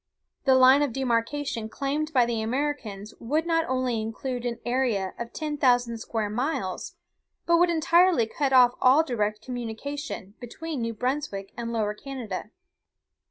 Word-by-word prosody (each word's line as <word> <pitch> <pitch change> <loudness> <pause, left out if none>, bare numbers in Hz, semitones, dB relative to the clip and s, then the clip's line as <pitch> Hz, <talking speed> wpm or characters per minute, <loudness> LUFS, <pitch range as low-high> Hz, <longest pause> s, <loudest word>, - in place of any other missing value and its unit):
The 265 -2 +5
line 260 +2 +7
of 285 -5 0
demarcation 240 -1 -1
claimed 290 +6 -2
by 255 -5 +4
the 235 -2 -1
Americans 225 -4 -3
would 300 +8 0
not 330 -1 +1
only 255 -3 0
include 245 +3 -4
an 235 -1 -3
area 240 -7 0
of 235 0 -5
ten 305 -1 -4
thousand 245 -4 +2
square 225 -2 -2
miles, 215 - -3 0.5
but 340 0 +4
would 350 +1 +4
entirely 335 -4 +4
cut 275 +4 -1
off 250 -2 +6
all 265 +5 +6
direct 215 -7 -2
communication 245 -2 -5
between 280 +4 -6
New 230 0 -2
Brunswick 250 -6 -3
and 235 -1 -4
Lower 215 -2 0
Canada. 255 0 -6
250 Hz, 150 wpm, -26 LUFS, 225-290 Hz, 0.5 s, line